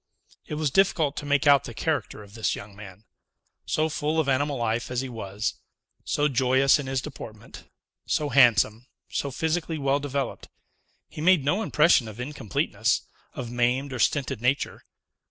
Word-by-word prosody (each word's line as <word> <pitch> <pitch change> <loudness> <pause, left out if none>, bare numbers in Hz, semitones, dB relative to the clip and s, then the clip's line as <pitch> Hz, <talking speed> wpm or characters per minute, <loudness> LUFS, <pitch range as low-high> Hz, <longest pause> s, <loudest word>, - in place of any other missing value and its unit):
It 150 - -4
was 150 -2 -1
difficult 160 -5 +2
to 145 - -5
make 145 0 +2
out 140 -3 +5
the - - -8
character 105 - -2
of 100 -1 -16
this 110 -1 -1
young 100 0 -10
man. 100 0 -12 0.6
So 155 +1 +1
full 155 +1 -1
of 155 - +1
animal 140 +1 +1
life 115 0 -1
as 125 0 -1
he 135 - -5
was, 105 -2 -4 0.4
so 145 - +1
joyous 130 +1 +3
in 140 - -5
his 135 -1 -1
deportment, 110 -7 -10 0.4
so 150 -1 0
handsome, 120 -3 +4 0.2
so 140 - -2
physically 160 +3 -2
well 140 -1 +1
developed, 140 -2 -4 0.6
he - - -9
made 175 -4 +4
no 185 +9 +1
impression 150 - +3
of 110 +1 -10
incompleteness, 125 -4 -1 0.3
of 120 - -5
maimed 125 +3 0
or 125 - -4
stinted 135 -3 0
nature. 130 +3 -1
135 Hz, 165 wpm, -26 LUFS, 120-150 Hz, 0.6 s, out